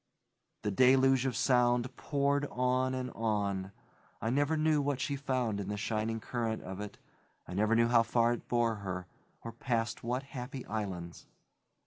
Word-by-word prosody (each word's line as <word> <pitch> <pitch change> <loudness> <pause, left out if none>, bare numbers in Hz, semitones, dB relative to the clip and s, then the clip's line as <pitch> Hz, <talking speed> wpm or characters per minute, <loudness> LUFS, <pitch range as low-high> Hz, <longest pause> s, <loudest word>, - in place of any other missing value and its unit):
The 105 - 0
deluge 130 +3 +5
of 125 - -2
sound 125 0 +2
poured 140 0 0
on 130 +1 +1
and 130 0 -3
on; 100 -4 -1 0.5
I 110 - -1
never 145 +4 +2
knew 155 -1 +3
what 140 -2 -1
she 140 +1 -1
found 130 -6 -1
in 100 - -4
the 105 0 -3
shining 110 +1 -1
current 115 -1 -3
of 95 +2 -6
it; 105 -1 -7 0.5
I - - -7
never 105 +4 +2
knew 115 0 +4
how 120 -1 +5
far 115 +1 +2
it 120 - -7
bore 120 -2 +1
her, 90 -2 -4 0.4
or 115 - -5
past 115 -1 -2
what 125 +3 -1
happy 130 -1 -7
islands. 95 -6 -5
120 Hz, 165 wpm, -32 LUFS, 110-130 Hz, 0.5 s, deluge